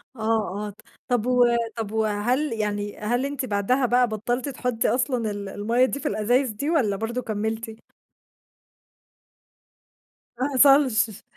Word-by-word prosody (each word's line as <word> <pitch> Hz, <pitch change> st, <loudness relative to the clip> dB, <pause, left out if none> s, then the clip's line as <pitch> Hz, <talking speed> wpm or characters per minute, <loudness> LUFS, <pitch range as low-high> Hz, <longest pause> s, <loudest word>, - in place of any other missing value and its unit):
آه، 220 Hz, -3 st, -1 dB
آه، -, -, -5 dB
ط 205 Hz, -, -15 dB, 0.3 s
طب 245 Hz, -3 st, 0 dB
و 250 Hz, -1 st, +4 dB, 0.3 s
طب 220 Hz, -2 st, -4 dB
وهل 220 Hz, +6 st, 0 dB
يعني 205 Hz, -1 st, -3 dB
هل 240 Hz, +5 st, -1 dB
أنتِ 280 Hz, -2 st, -3 dB
بعدها 235 Hz, +5 st, +1 dB
بقى 245 Hz, 0 st, +3 dB
بطلتِ 240 Hz, +5 st, -2 dB
تحطي 250 Hz, -3 st, -1 dB
أصلًا 245 Hz, -3 st, 0 dB
ال 200 Hz, -1 st, -6 dB
المَيَّة 230 Hz, +6 st, +1 dB
دي 280 Hz, -, -3 dB
في -, -, -3 dB
الازايز 240 Hz, +5 st, +1 dB
دي 280 Hz, +9 st, -3 dB
والّا 240 Hz, -12 st, +2 dB
برضه 230 Hz, +4 st, -3 dB
كمّلتِ؟ 220 Hz, +1 st, -4 dB, 2.6 s
ما 260 Hz, +3 st, 0 dB
حصلش، 255 Hz, -6 st, +4 dB
230 Hz, 135 wpm, -24 LUFS, 210-250 Hz, 2.6 s, و